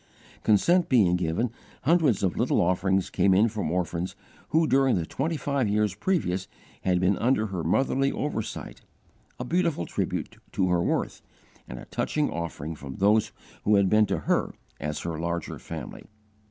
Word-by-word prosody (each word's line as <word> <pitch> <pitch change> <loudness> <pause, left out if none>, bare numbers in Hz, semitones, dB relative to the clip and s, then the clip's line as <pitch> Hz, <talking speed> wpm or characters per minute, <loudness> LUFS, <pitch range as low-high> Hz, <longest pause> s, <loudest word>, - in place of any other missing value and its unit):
Consent 170 - +3
being 100 -9 +4
given, 90 +7 -1 0.3
hundreds 155 - +3
of 95 -3 +1
little - - +1
offerings 95 +2 +1
came 95 +1 +3
in 105 +4 +5
from 105 -7 -3
orphans 90 0 -2 0.3
who 160 +1 +3
during 135 -2 +3
the 85 -3 -1
twenty 160 - -2
five 140 -5 0
years 105 -1 +1
previous 95 - -1 0.3
had 90 -1 +1
been 95 +2 +3
under 120 -2 +2
her 95 -5 -4
motherly 135 +9 +1
oversight 125 -7 -4 0.6
a 125 - -3
beautiful 170 - 0
tribute - - -3 0.2
to 95 -1 +1
her 90 -1 +2
worth - - -1 0.5
and - - -7
a - - -9
touching 150 -1 -1
offering 80 -2 -4
from 70 -3 -8
those 105 +2 +3 0.3
who 105 - +4
had 100 -2 +3
been 105 -1 +5
to - - -1
her - - 0 0.2
as 75 +1 -3
her 85 -2 -4
larger 85 0 -3
family. 80 -6 -8
100 Hz, 165 wpm, -26 LUFS, 85-130 Hz, 0.6 s, in